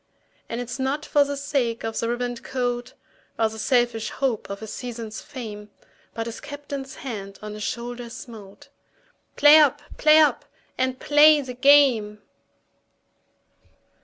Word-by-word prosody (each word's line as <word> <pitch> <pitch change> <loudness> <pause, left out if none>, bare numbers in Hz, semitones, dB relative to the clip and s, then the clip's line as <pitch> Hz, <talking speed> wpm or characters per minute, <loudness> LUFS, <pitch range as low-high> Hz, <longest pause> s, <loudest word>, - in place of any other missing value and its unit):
And 230 - -4
it's 245 +2 -6
not 275 +3 -2
for 290 - +3
the 285 0 -4
sake 260 -5 -2
of 225 0 -3
a 230 - -1
ribboned 245 0 -3
coat, 245 -1 -3 0.4
Or 225 -1 +2
the 220 0 -9
selfish 240 -1 +1
hope 255 -8 -2
of 200 +2 -6
a - - -4
season's 230 -1 -7
fame, 215 -6 -9 0.5
But 225 - -3
his 230 -1 -7
Captain's 285 -2 -7
hand 200 -6 -6
on 210 0 -6
his 210 - -8
shoulder 240 +2 -5
smote 230 +3 -12 0.7
"Play 295 +1 +8
up! 290 -1 +4 0.2
play 305 0 +6
up! 310 -1 +4 0.3
and 260 0 -1
play 300 +1 +6
the 255 -2 -7
game!" 250 -6 +4
245 Hz, 145 wpm, -24 LUFS, 225-280 Hz, 0.7 s, Play